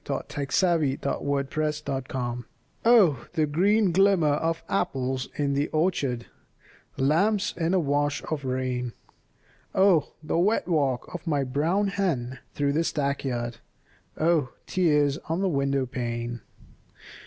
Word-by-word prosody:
LAWRENCE 140 Hz, -2 st, -2 dB
BALLAD 160 Hz, -8 st, +1 dB
OF 140 Hz, -, -1 dB
ANOTHER 140 Hz, +2 st, -1 dB
OPHELIA 125 Hz, -2 st, -3 dB, 0.4 s
Oh, 190 Hz, -, +5 dB
the 155 Hz, -, +2 dB
green 195 Hz, +6 st, +3 dB
glimmer 190 Hz, -3 st, +4 dB
of 165 Hz, +2 st, -1 dB
apples 130 Hz, -8 st, -1 dB
in 140 Hz, -1 st, 0 dB
the 140 Hz, +2 st, +1 dB
orchard, 145 Hz, -7 st, 0 dB, 0.7 s
Lamps 195 Hz, +9 st, +2 dB
in 170 Hz, +2 st, 0 dB
a -, -, +4 dB
wash 145 Hz, -1 st, 0 dB
of 150 Hz, -3 st, -4 dB
rain, 130 Hz, -2 st, -2 dB, 0.8 s
Oh, 190 Hz, -6 st, +4 dB
the 155 Hz, +2 st, 0 dB
wet 205 Hz, +4 st, +2 dB
walk 140 Hz, -8 st, 0 dB
of 175 Hz, 0 st, -7 dB
my 145 Hz, -3 st, +1 dB
brown 160 Hz, +10 st, +1 dB
hen 135 Hz, -11 st, -1 dB, 0.2 s
through 140 Hz, -1 st, +1 dB
the 160 Hz, +3 st, +2 dB
stackyard, 135 Hz, -6 st, -2 dB, 0.6 s
Oh, 155 Hz, -5 st, +2 dB, 0.2 s
tears 150 Hz, -5 st, +2 dB
on 165 Hz, +3 st, 0 dB
the 195 Hz, -, +2 dB
window 140 Hz, -4 st, +1 dB
pane! 120 Hz, -2 st, -4 dB
145 Hz, 130 wpm, -26 LUFS, 130-170 Hz, 0.8 s, Oh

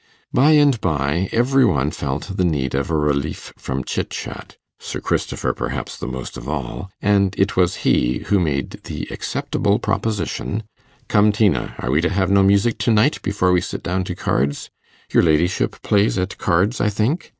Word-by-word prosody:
By 150 Hz, +4 st, +5 dB
and 145 Hz, -6 st, +4 dB
by 80 Hz, +2 st, 0 dB
every 130 Hz, +3 st, +3 dB
one 75 Hz, -, +2 dB
felt 75 Hz, +10 st, -4 dB
the 95 Hz, -, +1 dB
need 70 Hz, -7 st, 0 dB
of 70 Hz, +4 st, -1 dB
a 80 Hz, -, +1 dB
relief 75 Hz, 0 st, -1 dB
from 65 Hz, 0 st, -4 dB
chit -, -, -3 dB
chat -, -, -7 dB, 0.2 s
Sir -, -, -5 dB
Christopher -, -, -1 dB
perhaps -, -, -4 dB
the -, -, -6 dB
most 65 Hz, 0 st, -6 dB
of -, -, -7 dB
all 75 Hz, +7 st, -4 dB
and 100 Hz, -2 st, +3 dB
it 95 Hz, +1 st, +1 dB
was 90 Hz, 0 st, +2 dB
he 60 Hz, +1 st, +2 dB
who 100 Hz, -, +2 dB
made 70 Hz, -7 st, -2 dB
the -, -, -5 dB
acceptable 100 Hz, +1 st, -1 dB
proposition 105 Hz, 0 st, -2 dB, 0.4 s
'Come, 105 Hz, 0 st, +4 dB
Tina, 100 Hz, -, +1 dB
are 60 Hz, -, -2 dB
we 75 Hz, +4 st, +3 dB
to 90 Hz, -, +1 dB
have 95 Hz, 0 st, 0 dB
no 100 Hz, 0 st, +5 dB
music 100 Hz, +4 st, +3 dB
to 120 Hz, -, +2 dB
night 110 Hz, +7 st, +3 dB
before 100 Hz, -2 st, +1 dB
we 90 Hz, -1 st, +3 dB
sit -, -, -5 dB
down 95 Hz, +1 st, -1 dB
to 90 Hz, -, -4 dB
cards? 70 Hz, -1 st, -1 dB, 0.4 s
Your -, -, +6 dB
ladyship 85 Hz, +3 st, +1 dB
plays 105 Hz, 0 st, +2 dB
at 95 Hz, +1 st, -3 dB
cards, 95 Hz, +7 st, +1 dB
I 105 Hz, -, +3 dB
think? 110 Hz, -, -1 dB
95 Hz, 185 wpm, -20 LUFS, 75-105 Hz, 0.4 s, Your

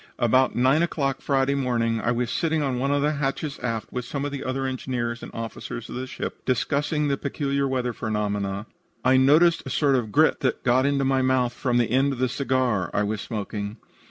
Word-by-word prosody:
"About 130 Hz, +2 st, +3 dB
nine 130 Hz, +6 st, +3 dB
o'clock 140 Hz, -5 st, -1 dB
Friday 135 Hz, -1 st, +1 dB
morning 115 Hz, -4 st, 0 dB
I -, -, 0 dB
was 120 Hz, -1 st, -1 dB
sitting 160 Hz, -2 st, 0 dB
on 130 Hz, -3 st, -1 dB
one 135 Hz, +2 st, 0 dB
of 145 Hz, 0 st, +2 dB
the 150 Hz, -, +2 dB
hatches 140 Hz, 0 st, -2 dB
aft 115 Hz, -3 st, -3 dB
with 125 Hz, -, -2 dB
some 140 Hz, +3 st, -4 dB
of 145 Hz, -, -3 dB
the 140 Hz, -1 st, -5 dB
other 135 Hz, +1 st, -2 dB
engineers 120 Hz, -2 st, -3 dB
and -, -, -8 dB
officers 115 Hz, +1 st, -6 dB
of -, -, -6 dB
the 130 Hz, +1 st, -4 dB
ship, 120 Hz, -, -6 dB
discussing 145 Hz, +4 st, 0 dB
the 140 Hz, -1 st, 0 dB
peculiar 140 Hz, 0 st, -1 dB
weather 125 Hz, -2 st, -1 dB
phenomena. 105 Hz, -3 st, -2 dB, 0.4 s
I 130 Hz, +1 st, +5 dB
noticed 155 Hz, +6 st, +5 dB
a -, -, -7 dB
sort 145 Hz, -3 st, +2 dB
of 115 Hz, -5 st, -1 dB
grit 155 Hz, +6 st, +4 dB
that 130 Hz, -, -1 dB
got 130 Hz, +2 st, +3 dB
into 140 Hz, -1 st, +1 dB
my 135 Hz, 0 st, +2 dB
mouth 130 Hz, -2 st, +2 dB
from 120 Hz, -1 st, 0 dB
the 120 Hz, -2 st, +1 dB
end 135 Hz, +2 st, +3 dB
of -, -, -6 dB
the 130 Hz, 0 st, +1 dB
cigar 125 Hz, -7 st, 0 dB
I 105 Hz, -, +2 dB
was 105 Hz, 0 st, -2 dB
smoking. 105 Hz, -1 st, -4 dB
130 Hz, 215 wpm, -25 LUFS, 120-140 Hz, 0.4 s, I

